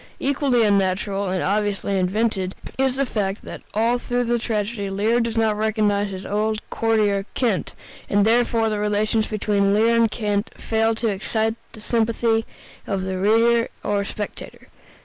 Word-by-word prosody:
Equally 270 -3 +2
unnatural, 200 -1 +1
and 185 -1 -1
obviously 200 -1 0
invented, 190 0 0 0.2
is 265 -1 +2
the 275 +1 +1
fact 205 -4 -2
that - - -8
all 230 +3 +2
through 245 0 -1
the 240 0 0
tragedy 210 -2 -2
Lear 210 +5 +1
does 230 -1 -1
not 220 -2 +2
recognize 210 -1 +1
his 190 0 -7
old 215 +1 -1
courtier, 210 -3 +1
Kent, 230 -7 0 0.3
and 205 0 +3
therefore 230 0 +2
the 210 -1 -2
relations 210 +1 +1
between 200 -2 +1
Lear 225 +2 +4
and 230 -1 +4
Kent 210 -1 -1
fail 225 0 +1
to 225 +1 -1
excite 220 +2 -1 0.2
the 220 - -11
sympathy 225 0 +1 0.4
of 195 -2 -1
the 190 0 -3
reader 230 +3 +3 0.2
or 205 -1 0
spectator. 205 +1 -7
215 Hz, 155 wpm, -22 LUFS, 200-230 Hz, 0.4 s, Lear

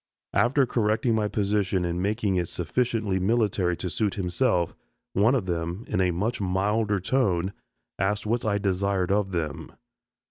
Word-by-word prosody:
After 130 +3 +3
correcting 115 0 +1
my 110 -1 +1
position 100 -3 0
and 85 +1 -2
making 105 0 0
it 90 -2 0
sufficiently 105 +3 -1
military 95 -4 +1
to 95 - -4
suit 100 +5 0
himself, 90 -1 0 0.4
one 110 +7 +4
of 115 -8 0
them, 85 +3 -3
in 95 - 0
a 90 - +3
much 105 +7 -1
milder 100 +2 +1
tone, 95 -4 +1 0.5
asked 105 +3 0
what 115 +3 0
I 105 -2 +1
desired 95 -1 0
of 100 -1 +2
them. 80 -5 -4
100 Hz, 150 wpm, -26 LUFS, 90-110 Hz, 0.5 s, one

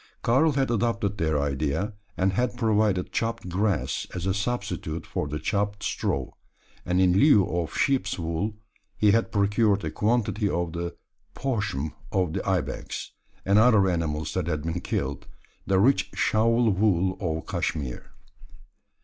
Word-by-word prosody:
Karl 140 +6 +3
had 135 -3 +1
adopted 115 -3 0
their 80 -3 +1
idea; 70 +8 -1 0.2
and 95 +1 +2
had 120 +2 0
provided 105 -5 +1
chopped 115 -5 -2
grass 100 +2 0
as 90 0 -4
a 95 - +1
substitute 100 -7 -3
for - - -3
the 75 +1 -3
chopped 100 +5 -1
straw, - - -2 0.6
and 90 +1 +2
in 90 -1 +4
lieu 105 -2 +5
of 85 -2 -3
sheep's 130 -8 +1
wool 85 +5 -2 0.4
he 105 -1 +4
had 115 +1 +2
procured 105 0 +2
a - - -2
quantity 105 -1 +1
of 85 -2 -2
the 85 0 -4 0.4
poshm 105 - -2 0.2
of 90 -4 0
the 95 - -2
ibex, 95 -3 -3 0.3
and 100 +2 +4
other 110 -4 +5
animals, 80 -3 -1
that 90 -3 -1
had 75 -3 -2
been 85 +2 -3
killed 70 -1 -3 0.4
the 95 - +3
rich 130 +7 +3
shawl 115 +1 +3
wool 95 -2 +2
of 80 -4 -2
Cashmere! 70 -6 -3
100 Hz, 150 wpm, -26 LUFS, 85-110 Hz, 0.6 s, lieu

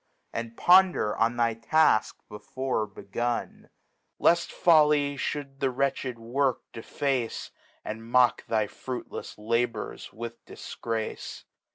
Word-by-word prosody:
And 115 0 -5
ponder 180 - +5
on 115 +1 +1
thyTaflc 115 +3 +2
before 110 +2 -3
begun, 120 +4 -4 0.5
Left 170 0 +3
Folly 150 -4 +4
fhou'd 140 0 -4
the 135 - +1
wretched 130 -1 -1
Work 125 +3 0
deface. 125 +1 -2 0.3
And 115 +1 -6
mock 125 -1 +4
thy 110 -2 +1
fruitlefs 125 +4 -7
Labors 115 +1 -2
with 115 +2 -8
Difgrace. 115 -1 -5
120 Hz, 100 wpm, -27 LUFS, 115-140 Hz, 0.5 s, ponder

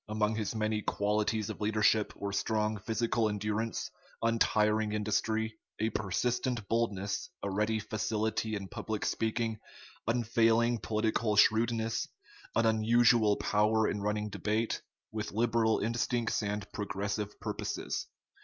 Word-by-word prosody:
Among 105 0 +1
his 110 0 -2
many 110 0 0
qualities 105 +1 0
of 110 - -9
leadership 110 0 +2
were 100 0 -4
strong 105 +1 0
physical 115 +1 0
endurance, 105 +2 -2 0.3
untiring 110 -2 +2
industry, 110 +1 -1 0.2
a 110 +1 +1
persistent 115 +3 -1
boldness, 105 -4 -1
a 100 - -1
ready 105 +3 +1
facility 110 +1 -1
in 100 -1 -5
public 110 +2 -4
speaking, 110 0 -1 0.5
unfailing 115 0 +3
political 110 +1 0
shrewdness, 115 +1 +3 0.5
an 115 - +3
unusual 110 -1 +4
power 105 +2 +2
in 105 - -2
running 105 +1 -1
debate, 105 +3 -1 0.3
with 110 -2 -4
liberal 115 0 +2
instincts 115 +1 0
and 105 0 -2
progressive 100 +1 -3
purposes. - - -3
110 Hz, 115 wpm, -31 LUFS, 105-115 Hz, 0.5 s, unusual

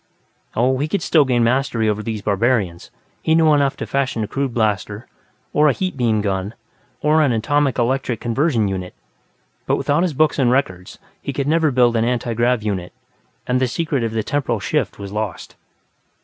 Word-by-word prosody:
Oh, 130 +3 +2
he 145 - 0
could 195 +6 -2
still 155 -4 +4
gain 120 -2 +2
mastery 120 -2 +1
over 105 0 0
these 110 -2 -4
barbarians; 100 -4 0 0.3
he 160 - +2
knew 160 -2 +5
enough 140 -2 +2
to - - -4
fashion 130 -5 -1
a - - -3
crude 135 +2 -2
blaster, 105 -1 -1 0.5
or 150 +1 +4
a - - +2
heat 185 +2 -3
beam 115 -5 +1
gun, 100 +1 -2 0.5
or 155 +1 +3
an 145 -4 +3
atomic 140 +4 +1
electric 125 -1 0
conversion 120 -2 +1
unit. 95 -2 -5 0.7
But - - +2
without 145 +3 +1
his 175 -5 0
books 155 +1 +2
and 125 -3 +3
records, 105 -9 -1 0.2
he - - -4
could 140 +1 -2
never 160 0 +3
build 125 -3 +3
an 115 - +2
antigrav 120 -1 0
unit, 95 -4 -3 0.5
and 125 0 +1
the 130 - +2
secret 145 -1 -1
of 115 -1 -2
the 110 -1 -1
"temporal 135 -4 -1
shift" 95 - -1
was 100 -1 -7
lost. 105 -2 -5
120 Hz, 185 wpm, -20 LUFS, 110-140 Hz, 0.7 s, knew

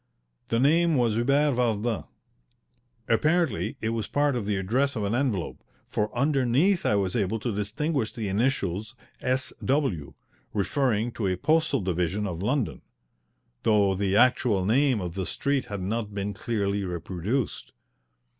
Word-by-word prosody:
The 115 - +1
name 165 +5 +4
was 120 -4 +2
Hubert 140 +6 +2
Vardin. 115 -2 0 1.0
Apparently 120 - +1
it 110 - 0
was 115 -2 -2
part 145 -1 +1
of 110 -5 -3
the 105 - +1
address 125 +9 0
of 110 - -2
an 100 +2 -1
envelope, 120 -9 -1 0.2
for 105 0 -1
underneath 140 +6 +2
I - - +3
was 95 -2 0
able 110 -1 0
to 115 +1 -2
distinguish 110 +5 -1
the 115 -4 -4
initials 105 0 -1 0.3
S.W., 130 - -1 0.4
referring 115 +1 +1
to 110 -4 -2
a 90 -1 0
postal 155 - +2
division 90 +2 -1
of 90 -3 -4
London, 125 +3 -1 0.8
though 105 -3 +3
the 95 0 0
actual 115 -5 +3
name 130 +3 +3
of 90 -3 -4
the 95 -1 -3
street 140 -2 -1
had 100 -2 -5
not 105 +1 -3
been 100 +1 -2
clearly 100 -2 -1
reproduced. 95 +7 -3
110 Hz, 145 wpm, -26 LUFS, 100-135 Hz, 1.0 s, name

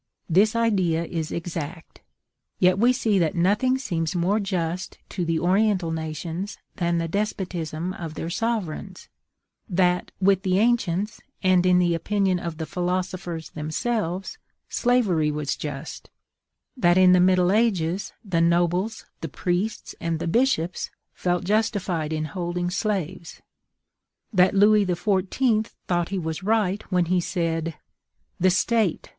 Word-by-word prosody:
This 200 +6 +3
idea 185 -8 +1
is 165 -2 -4
exact. 165 -1 -6 0.6
Yet 185 +1 +3
we 240 +3 +5
see 220 -5 +1
that 165 -3 +1
nothing 210 +9 +2
seems 170 -10 -2
more 185 +5 +2
just 180 -3 -3
to 180 - -3
the 165 -1 0
Oriental 185 0 +2
nations 160 +4 -4 0.2
than 170 -2 +1
the 165 0 -1
despotism 180 -3 -3
of 165 -6 -7
their 165 - -4
sovereigns; 195 -4 -3 0.6
that, 180 -1 +1
with 190 0 +3
the 185 -1 +1
ancients 210 -3 +1 0.2
and 185 -1 +4
in 180 0 +5
the 175 -1 +3
opinion 190 +2 +1
of 170 -2 -5
the 160 - -3
philosophers 180 -1 -3
themselves, 180 +4 -3 0.3
slavery 210 -11 +2
was 150 -1 -2
just; 145 0 -7 0.7
that 175 -8 +3
in 185 -1 +7
the 180 - +5
middle 180 0 +4
ages 195 -5 +1
the 175 -4 +1
nobles, 175 +5 +1 0.2
the 165 - -4
priests, 180 +8 -2
and 165 -1 -1
the 160 - -4
bishops 185 -4 +1 0.2
felt 180 -1 -1
justified 195 -6 0
in 155 0 -1
holding 175 +2 -3
slaves; 185 -4 -3 0.9
that 185 0 +4
Louis 210 +1 +6
XIV. 200 +5 +1
thought 175 -1 -2
that - - -13
he 195 - -2
was 160 0 -3
right 205 -1 +1
when 180 -1 +3
he 180 +1 +1
said, 165 -2 -2 0.6
"The 185 - +4
State! 210 0 +1
180 Hz, 140 wpm, -24 LUFS, 165-200 Hz, 0.9 s, in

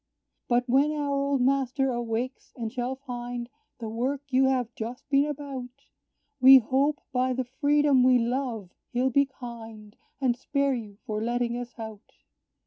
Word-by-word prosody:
"But 245 0 +2
when 275 +4 +3
our 290 -2 -1
old 275 -1 +1
master 270 0 +1
awakes, 240 +2 -3
and 230 -2 -5
shall 250 +1 -2
find 245 -2 -6 0.3
The 230 - -5
work 255 +6 -2
you 265 +1 +5
have 250 -3 0
just 235 +3 -6
been 280 +1 +3
about, 275 -4 -5 0.7
We 265 +1 +10
hope, 270 +5 +1
by 255 0 +1
the 260 +1 -1
freedom 285 +1 +3
we 255 0 +6
love, 235 -5 -2 0.2
he'll 255 +2 +1
be 280 +2 +3
kind, 225 -5 -10 0.2
And 255 -3 +2
spare 280 +2 0
you 215 -5 -6
for 215 0 -3
letting 240 +1 -1
us 245 -1 -6
out. 220 -2 -9
250 Hz, 155 wpm, -27 LUFS, 235-270 Hz, 0.7 s, We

